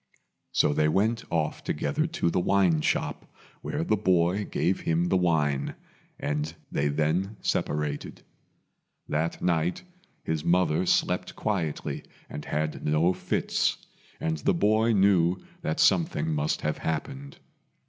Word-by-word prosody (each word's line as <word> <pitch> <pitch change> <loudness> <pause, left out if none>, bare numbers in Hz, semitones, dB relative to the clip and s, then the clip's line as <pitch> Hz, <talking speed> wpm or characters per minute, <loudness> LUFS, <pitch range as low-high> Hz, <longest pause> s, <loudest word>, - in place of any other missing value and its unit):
So - - +3
they 75 +1 +2
went 105 +8 +1
off 80 -2 -1
together 155 - -1
to 160 - -1
the 90 - +1
wine 90 -4 +3
shop, - - -1 0.3
where - - -2
the 110 - +2
boy 95 0 +2
gave 95 +2 0
him 80 +1 +1
the - - +2
wine 80 -6 +1 0.4
and 75 +1 -2 0.2
they 70 - +1
then 80 +8 0
separated. 75 -1 -2 0.8
That 80 +2 -2
night 85 0 0 0.4
his 80 -1 -2
mother 90 -1 +2
slept - - +1
quietly 85 -8 -2 0.3
and 75 - -6
had 75 +1 -2
no 80 +4 +3
fits, - - 0 0.4
and 80 -1 -1
the - - +1
boy 110 +5 +3
knew 95 -3 +4 0.2
that 80 - -2
something 80 -4 +2
must 75 0 0
have 75 - -2
happened. 135 - -4
85 Hz, 130 wpm, -27 LUFS, 75-95 Hz, 0.8 s, knew